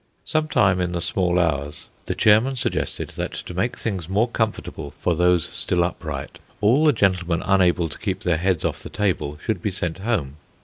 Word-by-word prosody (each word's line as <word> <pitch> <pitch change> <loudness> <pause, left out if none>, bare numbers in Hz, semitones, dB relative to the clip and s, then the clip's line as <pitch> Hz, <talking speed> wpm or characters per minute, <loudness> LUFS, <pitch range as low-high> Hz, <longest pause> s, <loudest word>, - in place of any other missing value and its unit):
Some 155 0 0
time 95 -9 +3
in 90 0 -1
the 85 - -1
small 90 +1 +1
hours, 75 -4 -1 0.2
the - - -1
chairman 110 +6 +4
suggested 125 - -2
that - - -3
to - - -6
make 95 +8 -1
things 95 -7 -3
more 105 +5 +2
comfortable 110 -2 -3
for 90 - +1
those 90 0 +3
still 90 -1 0
upright, 80 -5 -5 0.2
all 120 +9 +4
the 150 - +7
gentlemen 90 - +1
unable 90 -3 +3
to 75 - -10
keep - - -2
their 85 -3 +1
heads 90 -1 0
off - - -2
the - - -8
table 85 -7 -1
should 110 -6 -1
be 105 - 0
sent 90 -2 -3
home. 95 - -1
90 Hz, 190 wpm, -23 LUFS, 85-105 Hz, 0.2 s, the